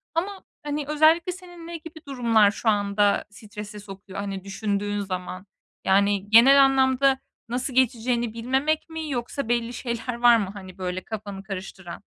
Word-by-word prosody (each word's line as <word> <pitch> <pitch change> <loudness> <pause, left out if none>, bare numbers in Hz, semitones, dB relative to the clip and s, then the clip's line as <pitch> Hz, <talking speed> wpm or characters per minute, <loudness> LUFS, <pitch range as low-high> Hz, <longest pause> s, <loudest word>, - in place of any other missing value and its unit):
Ama, 385 +3 -2 0.2
hani, 295 0 -3
özellikle 315 +4 +4
senin 350 -2 -11
ne 340 -1 -5
gibi 315 -1 -12
durumlar 230 -6 +3
şu 220 +2 -1
anda 205 0 +2
strese 210 0 -9
sokuyor? 195 -1 -9
Hani, 195 -2 -4
düşündüğün 205 0 -2
zaman. 185 -1 -5 0.4
Yani, 200 +1 +2
genel 270 +5 +8
anlamda 265 0 +3 0.3
nasıl 250 +2 -2
geçeceğini 240 -2 +1
bilmemek 265 +8 -1
mi 320 -1 -5
yoksa 245 0 -3
belli 240 0 0
şeyler 235 0 -4
var 240 0 +5
mı, 200 -3 -2
hani, 190 -2 -11
böyle 185 0 -4
kafanı 200 -3 -7
karıştıran? 190 -2 -8
230 Hz, 150 wpm, -25 LUFS, 200-275 Hz, 0.4 s, genel